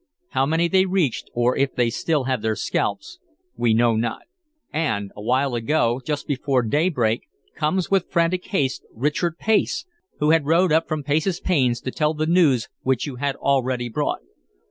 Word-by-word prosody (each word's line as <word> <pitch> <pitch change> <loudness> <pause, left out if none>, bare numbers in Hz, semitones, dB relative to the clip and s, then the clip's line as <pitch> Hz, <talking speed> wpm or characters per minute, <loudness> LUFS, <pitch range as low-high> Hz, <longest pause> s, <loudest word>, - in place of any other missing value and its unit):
How 135 - +1
many 165 +3 +2
they 190 +2 +3
reached, 180 -10 0
or 120 +1 +2
if 135 -1 0
they 120 -1 +2
still 150 +4 0
have 130 -3 -1
their 110 0 0
scalps, 225 - -2 0.4
we 115 -2 +2
know 115 0 +3
not. 115 +1 -2 0.5
And 100 -11 -1
awhile 125 +5 0
ago, 120 0 +1
just 150 +2 -3
before 135 -2 0
daybreak, 125 -3 0 0.3
comes 170 +5 -1
with 195 -2 +2
frantic 170 +1 +1
haste 135 -10 -1
Richard 150 +7 -1
Pace, 220 - +1 0.3
who 150 +1 +2
had 160 -3 +3
rowed 170 +2 +3
up 160 +1 +3
from 155 -2 -3
Pace's 155 +5 0
Pains 130 -9 +1
to 130 - -4
tell 150 +2 0
the 155 +1 -1
news 155 - +3
which 130 -2 0
you 135 -4 -6
had 140 +1 -1
already 130 -3 0
brought. 110 - -2
140 Hz, 170 wpm, -22 LUFS, 120-165 Hz, 0.5 s, they